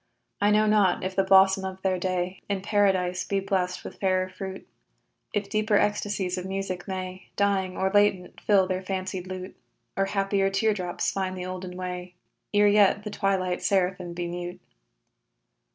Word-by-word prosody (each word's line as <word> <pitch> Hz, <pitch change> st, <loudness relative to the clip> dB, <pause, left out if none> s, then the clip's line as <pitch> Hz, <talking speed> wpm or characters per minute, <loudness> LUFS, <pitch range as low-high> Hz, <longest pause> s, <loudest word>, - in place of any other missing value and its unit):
I 205 Hz, -, +4 dB
know 210 Hz, +1 st, +4 dB
not 210 Hz, -4 st, +3 dB
if 185 Hz, 0 st, -3 dB
the 195 Hz, -, +3 dB
blossom 190 Hz, 0 st, +5 dB
of 190 Hz, 0 st, -6 dB
their 185 Hz, -1 st, +1 dB
day, 185 Hz, 0 st, -2 dB
In 195 Hz, -2 st, -1 dB
Paradise, 190 Hz, -3 st, +2 dB
be 195 Hz, +2 st, -1 dB
blessed 185 Hz, -2 st, -1 dB
with -, -, -9 dB
fairer 185 Hz, -1 st, +1 dB
fruit; 190 Hz, 0 st, -7 dB, 0.6 s
If 205 Hz, -2 st, -1 dB
deeper 215 Hz, 0 st, +2 dB
ecstasies 205 Hz, -3 st, 0 dB
of 180 Hz, -, -6 dB
music 190 Hz, -2 st, -4 dB
may, 185 Hz, -1 st, -5 dB
Dying 195 Hz, -2 st, +1 dB
or 190 Hz, 0 st, +1 dB
latent, 205 Hz, -3 st, +2 dB
fill 200 Hz, -3 st, +4 dB
their 185 Hz, 0 st, -2 dB
fancied 185 Hz, -1 st, -4 dB
lute, 185 Hz, 0 st, -7 dB, 0.4 s
Or 195 Hz, -, +2 dB
happier 195 Hz, 0 st, +1 dB
tear 215 Hz, +3 st, +2 dB
drops 180 Hz, -3 st, -2 dB
find 185 Hz, -1 st, -2 dB
the 180 Hz, -, -4 dB
olden 185 Hz, 0 st, -6 dB
way, 180 Hz, -1 st, -5 dB, 0.4 s
Ere 205 Hz, 0 st, +5 dB
yet 205 Hz, 0 st, +4 dB
the 210 Hz, -, -5 dB
twilight 190 Hz, -3 st, 0 dB
seraphim 180 Hz, -2 st, 0 dB
be 175 Hz, 0 st, -3 dB
mute. 175 Hz, 0 st, -5 dB
190 Hz, 170 wpm, -26 LUFS, 185-200 Hz, 0.6 s, blossom